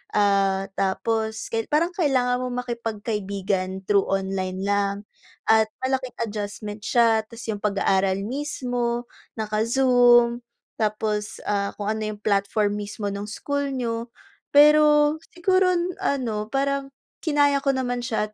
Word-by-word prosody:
ah, 195 Hz, -1 st, +2 dB
tapos 220 Hz, +3 st, -1 dB
ka 225 Hz, -1 st, -1 dB
parang 320 Hz, +3 st, +2 dB
kailangan 255 Hz, -7 st, +2 dB
mong 250 Hz, 0 st, -2 dB
makipagkaibigan 200 Hz, -5 st, -3 dB
through 200 Hz, -1 st, +4 dB
online 190 Hz, -1 st, -2 dB
lang. 200 Hz, 0 st, +1 dB, 0.5 s
At 220 Hz, 0 st, +6 dB, 0.2 s
malaking 260 Hz, -1 st, -1 dB
adjustment 205 Hz, -1 st, -5 dB
siya 225 Hz, -2 st, +3 dB
tapos 230 Hz, +1 st, -11 dB
yung 215 Hz, -, -1 dB
pag-aaral 195 Hz, -2 st, +1 dB
mismo, 245 Hz, -2 st, -2 dB, 0.3 s
naka-Zoom 240 Hz, +2 st, +3 dB, 0.3 s
tapos, 210 Hz, -1 st, -1 dB
ah, 200 Hz, -1 st, 0 dB
kung 205 Hz, 0 st, -3 dB
ano 220 Hz, 0 st, -1 dB
yung 205 Hz, -, -14 dB
platform 205 Hz, 0 st, +1 dB
mismo 205 Hz, 0 st, -4 dB
ng 200 Hz, +1 st, -4 dB
school 285 Hz, +6 st, -2 dB
niyo. 235 Hz, -2 st, -3 dB, 0.4 s
Pero 300 Hz, 0 st, +6 dB, 0.2 s
siguro 365 Hz, +1 st, +3 dB, 0.3 s
ano, 225 Hz, -6 st, -1 dB
parang 275 Hz, 0 st, 0 dB, 0.3 s
kinaya 290 Hz, -2 st, +2 dB
ko 275 Hz, -, 0 dB
naman 250 Hz, -2 st, -1 dB
siya 235 Hz, -3 st, -1 dB
225 Hz, 120 wpm, -24 LUFS, 205-255 Hz, 0.5 s, At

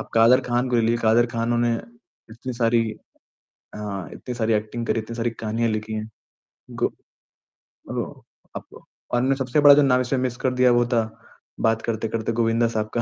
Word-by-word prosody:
आप -, -, -8 dB
कादर 115 Hz, +3 st, +6 dB
ख़ान 120 Hz, +1 st, +1 dB
को 120 Hz, -, +2 dB
ले 115 Hz, -, +3 dB
ली 115 Hz, +1 st, +2 dB
कादर 115 Hz, +1 st, +3 dB
ख़ान 115 Hz, 0 st, -1 dB
ने 120 Hz, 0 st, +2 dB, 0.6 s
इतनी 125 Hz, +3 st, -6 dB
सारी 115 Hz, -1 st, +2 dB
अ, -, -, -20 dB, 1.0 s
इतनी 125 Hz, -, -7 dB
सारी 115 Hz, -1 st, +1 dB
एक्टिंग 110 Hz, +2 st, -2 dB
करी 115 Hz, -, +1 dB
है, -, -, -5 dB
इतनी 115 Hz, +1 st, -8 dB
सारी 120 Hz, 0 st, -1 dB
कहानियाँ 115 Hz, +1 st, -2 dB
लिखी 110 Hz, 0 st, -3 dB
है। 110 Hz, 0 st, -4 dB, 0.7 s
गो -, -, +4 dB, 0.8 s
अ, -, -, -7 dB, 0.3 s
अब -, -, -10 dB, 0.3 s
और 130 Hz, +3 st, +2 dB
सबसे 130 Hz, +1 st, 0 dB
बड़ा 145 Hz, -1 st, +9 dB
जो 145 Hz, -, +5 dB
नाम 130 Hz, -2 st, +3 dB
इसमें 125 Hz, +1 st, -1 dB
मिस 125 Hz, -1 st, -2 dB
कर 130 Hz, 0 st, -1 dB
दिया, 125 Hz, 0 st, +4 dB
वो 120 Hz, 0 st, +3 dB
था 115 Hz, -1 st, +3 dB, 0.7 s
बात 110 Hz, 0 st, -1 dB
करते-करते 115 Hz, 0 st, -2 dB
गोविंदा 115 Hz, +1 st, +2 dB
साहब 110 Hz, 0 st, -1 dB
का। -, -, +2 dB
115 Hz, 190 wpm, -23 LUFS, 115-125 Hz, 1.0 s, बड़ा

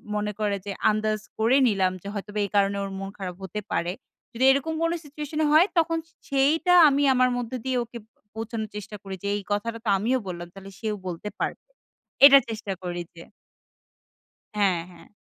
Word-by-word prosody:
মনে 210 Hz, 0 st, -1 dB
করে 205 Hz, -1 st, 0 dB
যে 200 Hz, -, -4 dB, 0.2 s
আন্দাজ 215 Hz, 0 st, 0 dB, 0.2 s
করে 230 Hz, +5 st, +4 dB
নিলাম 195 Hz, -4 st, +2 dB
যে -, -, -8 dB
হয়তোবা 210 Hz, 0 st, -5 dB
এই -, -, -6 dB
কারণে 200 Hz, 0 st, +3 dB
ওর 195 Hz, -, -5 dB
মন 195 Hz, 0 st, -5 dB
খারাপ 185 Hz, -3 st, -5 dB
হতে 190 Hz, +3 st, -4 dB
পারে। 170 Hz, +1 st, 0 dB, 0.4 s
যদি 240 Hz, +2 st, -1 dB
এরকম 280 Hz, +4 st, 0 dB
কোন 330 Hz, 0 st, +2 dB
সিচুয়েশনে 300 Hz, +1 st, -3 dB
হয়, 315 Hz, +4 st, +7 dB
তখন 330 Hz, 0 st, +2 dB
সে 325 Hz, -, -30 dB, 0.2 s
সেইটা 290 Hz, +6 st, +3 dB, 0.2 s
আমি 285 Hz, +1 st, +1 dB
আমার 255 Hz, 0 st, +3 dB
মধ্যে 245 Hz, +1 st, -4 dB
দিয়ে 260 Hz, -1 st, 0 dB
ওকে 235 Hz, +1 st, -10 dB
ব -, -, -41 dB, 0.3 s
বোঝানোর 220 Hz, -1 st, -4 dB
চেষ্টা 210 Hz, 0 st, -7 dB
করি 195 Hz, -1 st, -6 dB
যে, -, -, -2 dB
"এই 205 Hz, -, -3 dB
কথাটা 230 Hz, +3 st, -2 dB
তো -, -, +1 dB
আমিও 235 Hz, +7 st, +1 dB
বললাম। 175 Hz, -1 st, -5 dB
তাহলে 195 Hz, 0 st, -11 dB
সেও 215 Hz, -2 st, -2 dB
বলতে 180 Hz, +3 st, -5 dB
পারবে।" -, -, -3 dB, 0.6 s
এটা 280 Hz, 0 st, +10 dB
চেষ্টা 215 Hz, -3 st, -4 dB
করি 175 Hz, -1 st, -3 dB
যে 165 Hz, -, -10 dB, 1.3 s
হ্যাঁ, 195 Hz, -4 st, +2 dB
হ্যাঁ। 175 Hz, -, -16 dB
215 Hz, 190 wpm, -25 LUFS, 195-260 Hz, 1.3 s, এটা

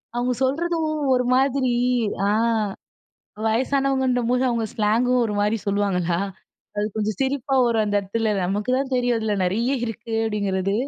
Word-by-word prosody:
அவங்க 245 Hz, +1 st, 0 dB
சொல்றதும். 320 Hz, +3 st, 0 dB, 0.2 s
ஒரு 250 Hz, 0 st, +2 dB
மாதிரி 265 Hz, -1 st, +2 dB, 0.6 s
அ. -, -, +2 dB, 1.2 s
வயசானவங்கன்ற 265 Hz, +1 st, +1 dB
போது 250 Hz, +1 st, +2 dB
அவங்க 230 Hz, -2 st, 0 dB
ஸ்லாங்கும் 240 Hz, +3 st, +2 dB
ஒரு 210 Hz, -, -3 dB
மாரி 210 Hz, +2 st, +1 dB
சொல்லுவாங்களா, 185 Hz, -4 st, 0 dB, 0.6 s
அது 205 Hz, -, 0 dB
கொஞ்சம் 215 Hz, -1 st, -2 dB
சிரிப்பாவும் 270 Hz, -1 st, +1 dB
வரும் 225 Hz, -2 st, +2 dB
அந்த 205 Hz, 0 st, 0 dB
இடத்துல. 215 Hz, +2 st, -1 dB
நமக்கு 205 Hz, +6 st, -1 dB
தான் 270 Hz, -1 st, -3 dB
தெரியும் 245 Hz, -1 st, +1 dB
அதில 215 Hz, -2 st, -1 dB
நிறைய 220 Hz, +7 st, 0 dB, 0.2 s
இருக்கு 230 Hz, 0 st, -6 dB
அப்படிங்கிறது. 200 Hz, -2 st, -1 dB
235 Hz, 140 wpm, -23 LUFS, 210-260 Hz, 1.2 s, ஒரு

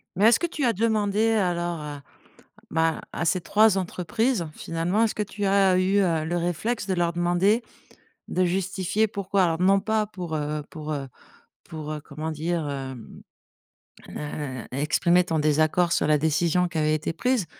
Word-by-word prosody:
Mais 195 Hz, +4 st, +3 dB
est-ce 230 Hz, -, +5 dB
que 345 Hz, -, 0 dB
tu 305 Hz, -5 st, -2 dB
as 235 Hz, -, +3 dB
demandé 215 Hz, 0 st, +1 dB
alors 175 Hz, -5 st, 0 dB
à 145 Hz, -2 st, -7 dB, 0.7 s
bah, 160 Hz, 0 st, +1 dB
à 170 Hz, -, -2 dB
ces 175 Hz, +2 st, +1 dB
3 210 Hz, +2 st, +4 dB
entreprises 190 Hz, +3 st, -1 dB
finalement, 170 Hz, +8 st, -1 dB
est-ce 225 Hz, -, 0 dB
que 210 Hz, -, 0 dB
tu 205 Hz, 0 st, -7 dB
as 195 Hz, -1 st, +4 dB
eu, 190 Hz, +2 st, +2 dB
heu, 165 Hz, -5 st, +1 dB
le 170 Hz, +2 st, -1 dB
réflexe 175 Hz, +6 st, -2 dB
de 190 Hz, -, -1 dB
leur 175 Hz, -1 st, 0 dB
demander, 175 Hz, +6 st, +2 dB, 0.7 s
de 185 Hz, -, +1 dB
justifier 190 Hz, +3 st, 0 dB
pourquoi? 200 Hz, -1 st, 0 dB
Alors, 165 Hz, -2 st, +1 dB
non 195 Hz, +2 st, +4 dB
pas 215 Hz, +1 st, 0 dB
pour, 180 Hz, -6 st, -5 dB
heu 150 Hz, 0 st, -2 dB
pour, 155 Hz, -1 st, -6 dB
heu 140 Hz, -2 st, -4 dB, 0.6 s
pour, 155 Hz, -1 st, -7 dB
heu, 150 Hz, -, -5 dB
comment 155 Hz, +2 st, -6 dB
dire? 160 Hz, +1 st, -2 dB
Hem, 130 Hz, -4 st, -7 dB, 0.9 s
heu, 145 Hz, -4 st, -5 dB
exprimer 160 Hz, +6 st, +2 dB
ton 165 Hz, -3 st, -1 dB
désaccord 155 Hz, +3 st, +2 dB
sur -, -, +1 dB
la 150 Hz, 0 st, +4 dB
décision 165 Hz, +4 st, +2 dB
qui 170 Hz, -, -5 dB
avait 155 Hz, 0 st, +2 dB
été 155 Hz, +1 st, -2 dB
prise, 250 Hz, +3 st, 0 dB
175 Hz, 175 wpm, -25 LUFS, 155-200 Hz, 0.9 s, est-ce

